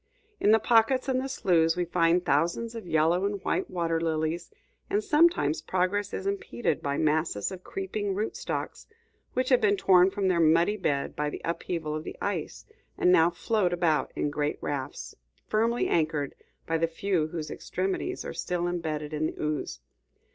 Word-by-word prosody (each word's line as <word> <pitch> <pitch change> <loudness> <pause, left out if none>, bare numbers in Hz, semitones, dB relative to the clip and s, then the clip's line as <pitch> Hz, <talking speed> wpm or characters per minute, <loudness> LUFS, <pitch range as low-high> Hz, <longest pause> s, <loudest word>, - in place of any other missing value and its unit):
In - - +3
the 220 - +7
pockets 235 +4 +3
and 260 -1 +1
the 270 - -4
sloughs, 170 -10 +2
we 175 - 0
find 175 +1 +2
thousands 170 +10 +1
of 225 -6 -8
yellow 165 +3 +2
and 200 0 -1
white - - -1
water 165 -2 -1
lilies, 160 +1 -1 0.4
and 210 +1 +1
sometimes 300 - +3
progress 190 +2 0
is 190 - -5
impeded 200 -2 -2
by 140 0 -2
masses 155 - 0
of 185 -1 -8
creeping 195 +1 -3
root 215 +3 -2
stalks - - -5 0.5
which 255 0 +1
have 255 -2 +4
been 205 -1 +3
torn 185 -1 +5
from 195 0 -1
their 180 -2 +2
muddy 165 +5 +4
bed 145 -9 -1
by 150 0 -1
the - - -7
upheaval 165 -2 -3
of 155 0 -4
the - - -8
ice, - - -3 0.3
and 180 - +4
now 165 -2 +6
float 180 +1 0
about 165 -5 +1
in 145 - -1
great 145 0 -1
rafts, 140 -1 -5 0.3
firmly 230 +2 +1
anchored 155 -3 0 0.3
by 165 0 0
the 165 - +2
few 165 -1 -1
whose 155 -1 -5
extremities 190 +1 -3
are - - -5
still 175 -1 -2
imbedded 155 -4 -3
in 155 +1 0
the - - -8
ooze. 150 - -3
175 Hz, 175 wpm, -28 LUFS, 155-200 Hz, 0.5 s, the